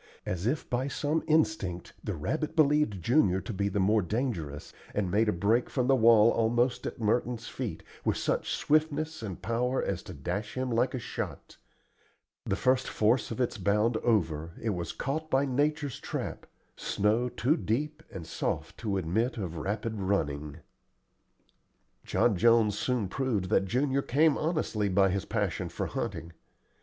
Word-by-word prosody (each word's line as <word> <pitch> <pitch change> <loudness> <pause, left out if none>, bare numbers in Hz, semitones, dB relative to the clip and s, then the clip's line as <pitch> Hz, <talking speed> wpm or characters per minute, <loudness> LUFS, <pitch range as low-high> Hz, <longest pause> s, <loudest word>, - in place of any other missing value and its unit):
As 90 +3 -2
if 145 +5 -1
by 125 +2 -1
some 150 +3 0
instinct 155 - +1
the 105 - -3
rabbit 155 - -2
believed 150 - +3
Junior 100 - +3
to 115 - -6
be 100 +1 0
the 100 - -1
more 105 +3 +3
dangerous, 90 - -3 0.2
and 95 -4 0
made 110 +2 +3
a - - +4
break 105 +7 +1
from 125 -3 0
the 135 +1 +4
wall 115 -2 +6
almost 120 +2 +1
at - - -6
Merton's 115 +1 0
feet, - - -5 0.2
with - - +1
such - - -1
swiftness 155 0 +1
and 100 -5 -6
power 125 +4 0
as 95 -2 -2
to 90 - -9
dash 90 +8 -4
by 130 - -1
him 130 -1 -2
like 120 +3 +1
a - - -2
shot. - - -6 0.9
The 95 - +1
first 130 +4 +2
force 110 +3 +2
of 115 - -5
its 120 -3 -1
bound 105 +4 +2
over, 85 -9 0
it 110 - -1
was 85 -3 -3
caught 155 +4 -3
by 135 0 +3
nature's 145 +1 0
trap - - -5 0.3
snow 110 +5 +1
too 125 +4 +1
deep 150 +4 -2
and 90 -4 -7
soft - - -3
to 105 -4 -1
admit 110 +9 0
of 90 -6 -4
rapid 105 +5 -3
running. 75 -7 -1 1.4
John 115 -4 +2
Jones 110 +1 +4
soon 120 -2 0
proved 110 -4 -1
that - - +3
Junior 135 +6 +1
came 150 +4 +3
honestly 155 - 0
by 95 +1 +4
his 100 +1 -2
passion 105 -6 -1
for - - -3
hunting. 85 +1 -4
115 Hz, 165 wpm, -29 LUFS, 100-130 Hz, 1.4 s, wall